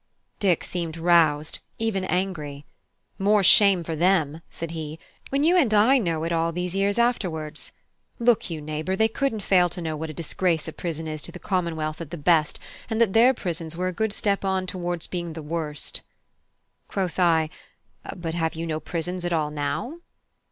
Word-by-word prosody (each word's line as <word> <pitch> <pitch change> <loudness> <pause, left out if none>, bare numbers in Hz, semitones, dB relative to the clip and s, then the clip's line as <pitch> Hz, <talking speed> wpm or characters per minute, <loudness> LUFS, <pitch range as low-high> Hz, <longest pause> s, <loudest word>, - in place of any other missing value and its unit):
Dick 185 -5 +2
seemed 170 -2 -4
roused, 160 -3 +3 0.2
and 225 - -1
even 195 -4 0
angry. 155 -7 -2 0.5
"More 205 +1 +4
shame 195 -1 +7
for 165 0 -3
them," 165 -3 +2
said 165 -1 -6
he, 160 -1 -5 0.3
"when 275 +1 +1
you 340 +4 +5
and 290 -11 +4
I 245 +6 +5
know 165 -7 -1
it 165 - -2
all 165 0 +1
these 180 +2 -3
years 200 +2 +1
afterwards. 180 -11 -1 0.5
Look 235 -4 +2
you, 160 -2 -4
neighbour, 155 +4 -2
they 220 +3 +3
couldn't 225 -1 -1
fail 180 -2 +4
to 180 - -6
know 160 -2 -3
what 160 +1 -5
a - - -6
disgrace 170 +1 -1
a 160 - -5
prison 160 -2 -4
is 155 -1 -4
to - - -5
the - - -8
Commonwealth 165 -4 -2
at 165 - -6
the 175 - -6
best, 155 0 +3 0.3
and 220 -1 -1
that 225 -5 +3
their 245 +4 +6
prisons 170 -5 -4
were 185 +1 0
a - - -5
good 220 +4 0
step 200 -1 0
on 190 -1 0
towards 175 -2 -3
being 175 -1 -4
at 165 - -6
the 160 - -6
worst." 150 -2 -3 0.9
Quoth 185 -2 -2
I: 160 -3 +3 0.6
"But 170 -3 -4
have 160 -1 -1
you 165 +1 -3
no 155 -1 -2
prisons 175 +2 -3
at 175 0 -1
all 155 -2 0
now?" 150 - -3
175 Hz, 195 wpm, -25 LUFS, 160-195 Hz, 0.9 s, shame